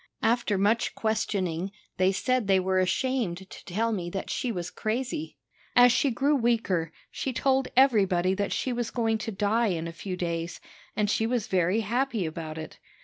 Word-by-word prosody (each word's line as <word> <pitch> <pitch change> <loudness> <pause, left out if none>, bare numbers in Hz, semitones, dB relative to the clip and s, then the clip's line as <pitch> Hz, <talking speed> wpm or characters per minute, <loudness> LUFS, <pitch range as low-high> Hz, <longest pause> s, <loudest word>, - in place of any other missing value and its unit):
After 230 -2 +2
much 210 +4 +1
questioning, 195 -5 -1 0.3
they 185 0 +4
said 250 +3 0
they 190 -1 +5
were 185 0 +1
ashamed 190 -2 0
to - - -12
tell 225 +6 0
me 180 -5 -2
that 195 +2 -4
she 250 -3 -1
was 180 -4 -4
crazy. 260 - -3 0.4
As 245 0 +8
she 275 - +2
grew 275 +5 +2
weaker, 225 - +1 0.2
she 265 - -3
told 265 +1 +1
everybody 195 -9 +4
that 200 +1 -1
she 255 - -1
was 240 -1 -2
going 225 -2 0
to 225 +1 -4
die 210 +3 +1
in 170 -4 -1
a 165 - -6
few 180 +3 -5
days, 170 -1 -3 0.4
and 210 -1 +1
she 220 +2 +1
was 240 -3 0
very 185 +4 +1
happy 235 -1 0
about 160 0 -5
it. 155 - -8
210 Hz, 180 wpm, -27 LUFS, 185-240 Hz, 0.4 s, As